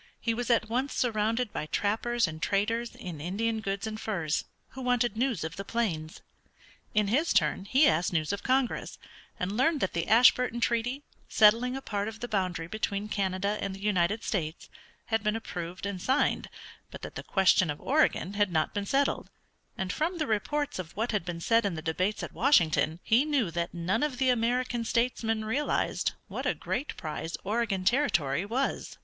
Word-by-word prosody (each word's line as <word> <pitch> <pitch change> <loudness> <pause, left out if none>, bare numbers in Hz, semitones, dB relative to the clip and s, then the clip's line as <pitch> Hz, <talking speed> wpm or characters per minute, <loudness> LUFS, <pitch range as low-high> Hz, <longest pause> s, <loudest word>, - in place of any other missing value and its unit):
He 230 - 0
was 240 +1 -3
at 230 -2 +3
once 255 +5 -1
surrounded 225 0 0
by 155 - -3
trappers 225 +6 +1
and 155 0 -7
traders 225 +5 0
in 170 -5 -7
Indian 220 +7 -1
goods 200 -1 -3
and 220 0 -5
furs 170 -8 -1 0.2
who 265 - -9
wanted 245 -3 +1
news 235 -6 0
of 160 0 -5
the 195 - -4
plains. 180 -8 -2 0.7
In 210 -1 +3
his 295 +10 +2
turn 185 -1 +2
he 270 +8 +4
asked 170 +3 +2
news 160 +1 0
of 200 - -3
Congress, 260 -1 0 0.4
and 185 +3 -2
learned 295 +6 +2
that 190 - -1
the 170 0 -1
Ashburton 240 +2 +5
Treaty, 240 +4 0 0.3
settling 230 +4 +4
a 270 - -8
part 205 -1 -2
of 220 0 -7
the 240 - -4
boundary 185 -6 -1
between 205 +2 -3
Canada 200 +1 -1
and 195 -1 -3
the - - -11
United 205 +1 +1
States, 160 -5 -3 0.4
had 225 - +3
been 210 +1 0
approved 180 -5 -5
and 200 -2 -4
signed, 265 +7 +1 0.4
but - - -10
that - - -6
the - - -5
question 185 -2 +3
of 150 - -3
Oregon 275 - +1
had 205 -2 +1
not 155 -2 0
been 205 -1 -3
settled, 275 +4 +1 0.5
and 185 -1 -2
from 335 - -1
the 310 - 0
reports 290 +4 -1
of 170 -2 -7
what 225 +3 0
had 210 -5 0
been 170 -1 -5
said 230 +6 +3
in 200 -4 -1
the 160 - -5
debates 185 +6 -1
at - - -6
Washington 170 - +3
he 235 +5 +4
knew 280 - 0
that 170 +1 -2
none 180 +5 -1
of 295 -4 -1
the 260 0 +2
American 240 0 0
statesmen 225 -2 0
realized 270 +7 0
what - - -4
a - - +1
great 285 - -3
prize 160 +1 -4
Oregon 205 -2 -1
Territory 185 - +2
was. 260 +5 -2
215 Hz, 190 wpm, -29 LUFS, 185-240 Hz, 0.7 s, Ashburton